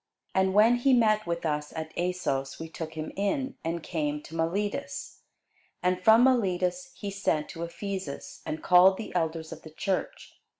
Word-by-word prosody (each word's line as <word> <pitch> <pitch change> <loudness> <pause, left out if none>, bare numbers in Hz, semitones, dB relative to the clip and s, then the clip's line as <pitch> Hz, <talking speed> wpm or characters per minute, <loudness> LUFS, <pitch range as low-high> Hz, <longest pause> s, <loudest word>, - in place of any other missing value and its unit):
And 190 0 +2
when 225 +4 +6
he 260 +2 +3
met 215 -4 +3
with 170 0 -2
us 150 -1 -1
at 160 0 -5
Assos, 170 -7 -2
we 165 - -5
took 160 0 -7
him 155 0 -4
in, 255 +7 -1
and 165 0 -3
came 150 -3 -2
to 165 - -10
Miletus. 190 +6 -2 0.6
And 180 0 +1
from 220 +3 +7
Miletus 225 0 +1
he 200 -2 -5
sent 195 -6 -1
to 165 - -8
Ephesus, 185 -2 -5
and 155 - -5
called 185 +1 +6
the 220 - -7
elders 160 -2 -1
of 160 -1 -8
the 160 - -11
church. 185 +4 -3
180 Hz, 170 wpm, -28 LUFS, 160-205 Hz, 0.6 s, from